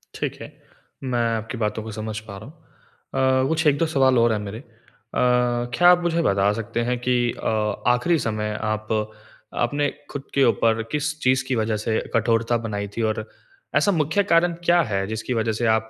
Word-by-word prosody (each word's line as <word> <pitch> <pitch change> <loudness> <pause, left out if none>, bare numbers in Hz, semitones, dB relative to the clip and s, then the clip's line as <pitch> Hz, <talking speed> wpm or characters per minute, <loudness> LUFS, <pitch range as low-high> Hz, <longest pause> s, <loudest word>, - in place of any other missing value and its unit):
ठीक - - -3
है। - - -8 0.5
मैं 125 -2 -1 0.2
आपकी 115 +3 -6
बातों 105 0 -2
को 110 - -7
समझ 110 0 -5
पा 100 - -7
रहा 100 - -10
हूँ। 135 -3 -3
अ, - - +1
कुछ 160 0 0
1-2 145 +3 +3
सवाल 135 -5 +3
और 115 0 +4
हैं 105 - -1
मेरे। 105 +1 -6
अ, - - -14 0.5
क्या 125 +5 +3
आप 180 0 +6
मुझे 170 -1 +1
बता 100 -7 +2
सकते 115 +1 -4
हैं 125 - 0
कि 125 +1 +1 0.3
अ, 105 -2 -1
आखिरी 125 +8 +3
समय 105 -3 -2
आप 110 0 -2 0.7
आपने 145 +4 0 0.2
खुद 140 -2 -5
के 140 - +3
ऊपर 115 -1 +2
किस 150 +1 -1
चीज़ 130 0 +2
की 130 - 0
वज़ह 110 -1 0
से 110 +1 -1
कठोरता 115 +1 +2
बनाई 100 -2 -3
थी? 115 - -2
और 110 0 -1 0.5
ऐसा 205 - +4
मुख्य 160 +3 +1
कारण 170 -2 +3
क्या 175 0 +5
है 95 -1 0
जिसकी 110 +3 -3
वज़ह 110 -1 0
से 120 - 0
आप 110 0 -3
120 Hz, 195 wpm, -23 LUFS, 110-140 Hz, 0.7 s, आप